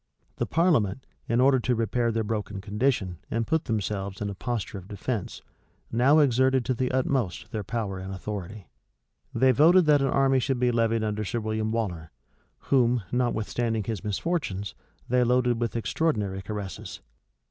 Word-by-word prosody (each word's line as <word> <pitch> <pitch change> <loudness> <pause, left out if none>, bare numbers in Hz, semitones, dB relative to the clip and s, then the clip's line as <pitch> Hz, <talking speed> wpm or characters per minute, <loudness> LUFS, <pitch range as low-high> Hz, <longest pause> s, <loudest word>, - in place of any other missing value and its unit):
The - - -1
parliament, 135 - +2 0.2
in 115 - +2
order 130 0 +5
to 125 +1 0
repair 115 +1 0
their 115 0 0
broken 105 -2 -3
condition, 105 -3 -1
and 115 0 -1
put 160 +4 0
themselves 100 -3 -2
in 100 -1 -2
a - - -5
posture 100 -2 -4
of 90 - -14
defence, 105 +1 -4 0.5
now 130 +6 +4
exerted 130 -3 +3
to 130 - +1
the 125 +1 -1
utmost 120 -5 -1
their 110 -3 -3
power 100 -3 -3
and 95 +1 -6
authority. 100 0 -6 0.6
They 130 0 +4
voted 165 +7 +6
that 150 -2 +5
an 135 - +2
army 135 0 +3
should 135 +1 0
be 125 0 +2
levied 115 -1 +1
under 105 0 -1
Sir 120 +4 -2
William 110 0 -2
Waller, 90 -8 -3 0.6
whom, 125 -4 +3
notwithstanding 115 -2 0
his 105 -3 -4
misfortunes, 105 - -2 0.3
they 125 +1 +3
loaded 125 -1 +2
with 115 -1 -1
extraordinary 105 -6 -1
caresses. 100 -1 -6
115 Hz, 160 wpm, -26 LUFS, 105-130 Hz, 0.6 s, voted